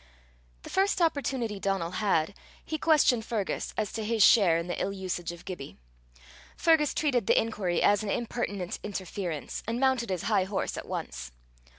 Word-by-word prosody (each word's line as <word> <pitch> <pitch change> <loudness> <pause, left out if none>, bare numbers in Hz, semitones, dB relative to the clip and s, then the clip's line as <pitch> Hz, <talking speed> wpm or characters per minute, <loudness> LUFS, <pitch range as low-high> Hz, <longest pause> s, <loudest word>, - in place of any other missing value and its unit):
The - - -9
first 390 0 +2
opportunity 265 - 0
Donal 195 -4 -1
had, 195 -4 +2 0.3
he 315 -1 -3
questioned 290 -8 +4
Fergus 220 -4 -2
as 215 -2 -1
to 220 - -3
his 220 -1 +3
share 190 -8 +6
in 170 - -2
the 175 - -3
ill 195 - 0
usage 185 -3 -4
of 175 0 -12
Gibbie. 175 -7 -7 0.8
Fergus 320 -3 +3
treated 255 -9 +1
the - - +5
inquiry 200 -6 -1
as 205 +1 +4
an 215 - -4
impertinent 205 -5 -3
interference, 185 -5 -4
and 230 +1 -1
mounted 260 -4 +2
his 185 -3 -2
high 185 - +2
horse 190 0 -2
at - - -7
once. - - -5
205 Hz, 170 wpm, -28 LUFS, 185-240 Hz, 0.8 s, share